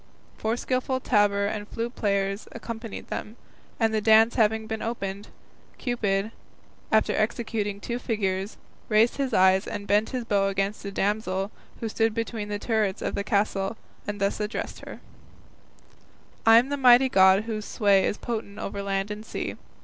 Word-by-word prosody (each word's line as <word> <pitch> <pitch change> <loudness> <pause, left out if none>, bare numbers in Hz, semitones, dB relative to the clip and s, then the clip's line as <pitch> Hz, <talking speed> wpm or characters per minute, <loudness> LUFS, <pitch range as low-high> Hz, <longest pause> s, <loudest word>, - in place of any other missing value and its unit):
Four 225 +2 -1
skillful 255 +1 -1
tabor 205 -4 +2
and 205 0 -3
flute 235 +3 -4
players 200 -1 -1
accompanied 230 -1 -7
them, 215 - -5 0.4
and 225 -2 +2
the 215 - +1
dance 220 +1 +6
having 220 -1 +2
been 220 0 -4
opened, 200 -3 -4 0.5
Cupid, 215 -4 -1 0.6
after 220 0 +3
executing 215 -2 -1
two 235 +4 -4
figures, 200 -4 -2 0.3
raised 220 +2 +4
his 275 -2 -1
eyes 190 -2 +4
and 200 - -5
bent 205 +2 +2
his 250 -3 -3
bow 200 -3 +2
against 195 +1 -2
a 200 - -4
damsel 200 -1 -1 0.3
who 230 - -1
stood 225 0 0
between 225 -2 -3
the 205 - -2
turrets 210 -3 -1
of - - -2
the 200 - -2
castle, 200 0 0 0.3
and 205 0 -4
thus 200 +1 0
addressed 210 +2 -4
her: - - -10 1.5
I 225 0 +9
am 245 +3 +3
the 285 - -1
mighty 255 0 +7
God 190 -3 +5
whose 215 -2 -4
sway 200 -3 +3
Is - - 0
potent 220 -3 -5
over 200 0 -4
land 195 0 -2
and 210 +1 -6
sea. - - -4
215 Hz, 165 wpm, -26 LUFS, 200-230 Hz, 1.5 s, I